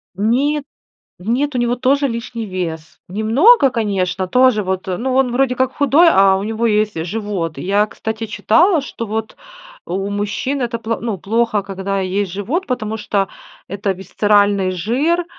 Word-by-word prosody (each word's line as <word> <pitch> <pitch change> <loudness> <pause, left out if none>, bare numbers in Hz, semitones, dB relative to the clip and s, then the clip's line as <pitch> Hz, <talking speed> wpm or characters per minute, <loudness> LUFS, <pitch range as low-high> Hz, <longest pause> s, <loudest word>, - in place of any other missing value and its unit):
Нет, 275 +8 +1 0.5
в 185 +5 -10
нет, 280 +4 0
у 250 - 0
него 240 0 +1
тоже 275 +3 +2
лишний 230 -1 -5
вес, 165 -4 -5
немного 265 - +4
конечно, 195 -6 -1
тоже 250 +1 +3
вот, 190 0 -3
э, 180 - -1
ну 255 +2 -2
он 260 -2 +2
вроде 255 0 +1
как 260 +1 0
худой, 295 +4 +4
а 195 -6 +5
у 195 - -3
него 225 +2 -1
есть 210 -6 0
живот. 190 -4 -4
И - - -5
я, 205 +3 +2
кстати, 220 +1 -5
читала, 320 - +3
что 230 -4 -6
вот, 220 +1 -4 0.5
у 195 +2 -3
мужчин 205 +7 -2
это 235 -1 -2
пло 230 0 -3
ну, 220 -5 -3
плохо, 220 +1 0
когда 195 0 -3
есть 190 0 -2
живот, 235 - -2
потому 220 -4 -3
что 205 -2 -1 0.4
это 200 +1 -2
висцеральный 200 +1 +1
жир. 265 - 0
215 Hz, 170 wpm, -18 LUFS, 195-250 Hz, 0.5 s, а